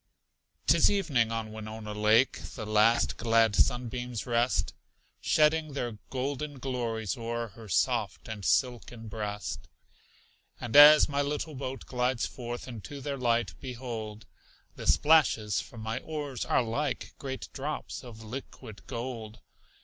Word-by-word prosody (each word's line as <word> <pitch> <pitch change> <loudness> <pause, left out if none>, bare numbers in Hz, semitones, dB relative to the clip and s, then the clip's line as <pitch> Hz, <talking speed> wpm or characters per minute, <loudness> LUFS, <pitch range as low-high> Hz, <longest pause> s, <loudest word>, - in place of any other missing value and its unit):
'Tis 165 +1 +5
evening; 145 - +1
on 115 -1 -3
Winona 110 0 -7
Lake 110 +4 +3
The 110 - -5
last 110 +2 +3
glad 115 -2 +3
sunbeams 120 -1 0
rest, 120 +1 +1 0.5
Shedding 155 0 +2
their 120 -6 -4
golden 140 +2 -3
glories 120 -5 -2
o'er 115 0 -3
Her 110 +1 -13
soft 115 -1 0
and 110 -3 -6
silken 120 0 0
breast. 105 -1 -5 0.9
And 120 -2 -5
as 150 +1 +10
my 140 -1 0
little 150 +2 -2
boat 135 -1 -5
glides 125 -1 0
forth 120 0 -6
Into 130 +4 -8
their 140 +1 -3
light, 120 -3 +1
behold! 115 -4 -6 0.5
The - - -7
splashes 115 - +4
from 115 - -11
my 110 +3 -3
oars 145 -4 -4
are - - +2
like 130 +5 -2
Great 130 -1 -5
drops 145 +1 -5
of 115 -3 -11
liquid 110 -2 -9
gold. 115 -3 -5
120 Hz, 130 wpm, -29 LUFS, 110-135 Hz, 0.9 s, as